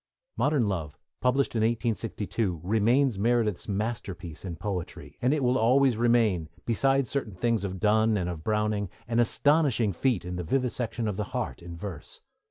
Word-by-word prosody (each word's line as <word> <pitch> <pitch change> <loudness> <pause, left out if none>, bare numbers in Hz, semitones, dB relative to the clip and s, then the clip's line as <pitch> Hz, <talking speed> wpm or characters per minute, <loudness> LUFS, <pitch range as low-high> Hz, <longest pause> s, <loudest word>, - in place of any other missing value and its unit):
Modern 145 -7 +2
Love, 80 -7 -3 0.2
published 130 +2 +1
in - - +2
1862, 110 -5 -1
remains 115 +4 +2
Meredith's 115 -3 +1
masterpiece 100 -6 -4
in 90 -3 -5
poetry, 95 0 -5
and 125 - +3
it 150 -2 +1
will 125 +1 +2
always 130 +2 +4
remain, 110 -8 +2 0.2
beside 135 +3 +2
certain 115 -8 -3
things 115 +2 0
of 95 -1 -4
Donne 110 +2 +3
and 90 -3 -1
of 85 -3 -5
Browning, 105 -1 0 0.2
an 115 +1 +1
astonishing 125 -3 +2
feat 115 0 0
in 90 0 -4
the 90 - -3
vivisection 120 +2 -1
of 100 -3 -2
the 105 - -1
heart 120 -6 -3
in 85 0 -8
verse. 90 -4 -7
110 Hz, 165 wpm, -27 LUFS, 95-120 Hz, 0.2 s, always